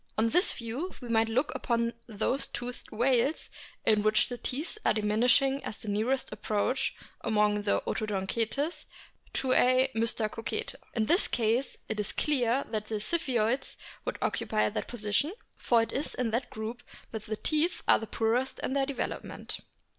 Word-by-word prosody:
On 225 +1 +3
this 355 - +5
view 245 +11 -4
we 245 - -8
might 225 0 +3
look 255 +6 +1
upon 235 -2 0
those 225 +5 -1
toothed 245 0 -6
whales 250 +5 +1 0.3
in 215 -1 +4
which 215 +2 +3
the 245 - -4
teeth 305 +11 -4
are - - +3
diminishing 245 +6 +3
as 215 - -5
the 215 - -4
nearest 230 +6 0
approach 215 +5 0 0.3
among 210 -2 +2
the 205 - +1
Odontocetes 220 - -1 0.5
to 260 -1 +1
a 255 +1 +4
Mystacocete. 225 -1 -1 0.2
In 220 -2 +2
this 345 - +3
case 235 +3 0
it 220 -1 -3
is 210 - -1
clear 265 -3 +2
that 215 -1 -2
the 220 - -2
Ziphioids 250 -2 0 0.3
would - - -3
occupy 215 -1 +1
that 210 - -3
position, 230 - 0 0.2
for 235 -2 +3
it - - -4
is 285 - -2
in 245 -3 0
that 245 +2 -1
group 220 +3 -5 0.3
that 220 -2 -6
the 215 - -1
teeth 315 +7 +1
are - - +5
poorest 230 +4 0
in - - -1
their 275 -1 +1
development. 280 - -4
235 Hz, 160 wpm, -30 LUFS, 215-265 Hz, 0.5 s, this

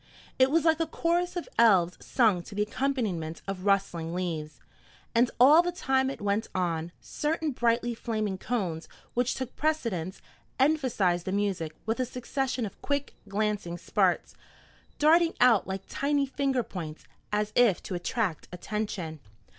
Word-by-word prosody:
It 260 0 +6
was 330 +3 +2
like 320 -1 +4
a 330 - 0
chorus 345 +3 0
of 350 - -4
elves 185 -7 +4
sung 215 -8 +3
to 195 - -11
the 210 - +2
accompaniment 210 - -2
of 195 -1 -4
rustling 175 -4 +1
leaves. 160 -4 -4 0.5
And 235 +1 +4
all 290 +7 +8
the 355 0 -2
time 265 -7 +1
it 275 - -6
went 205 +1 0
on, 170 -2 -1
certain 310 0 -2
brightly 240 -1 +1
flaming 215 -4 -3
cones, 185 -10 -2 0.3
which 245 +1 +1
took 260 -1 -5
precedence, 230 - -1 0.4
emphasized 255 - +2
the 190 - -2
music 190 -6 -1
with 225 +3 -1
a 255 - +1
succession 255 0 -2
of 200 - -9
quick, 285 0 -2 0.2
glancing 205 -4 -1
sparks, - - +1 0.6
darting 330 +3 +4
out 235 -7 +5
like 190 0 -4
tiny 285 0 0
finger 270 -2 0
points, 165 -8 -7 0.3
as 210 0 -1
if 230 -8 +4
to - - -5
attract 180 -1 -2
attention. 180 -4 -4
220 Hz, 150 wpm, -28 LUFS, 185-270 Hz, 0.6 s, all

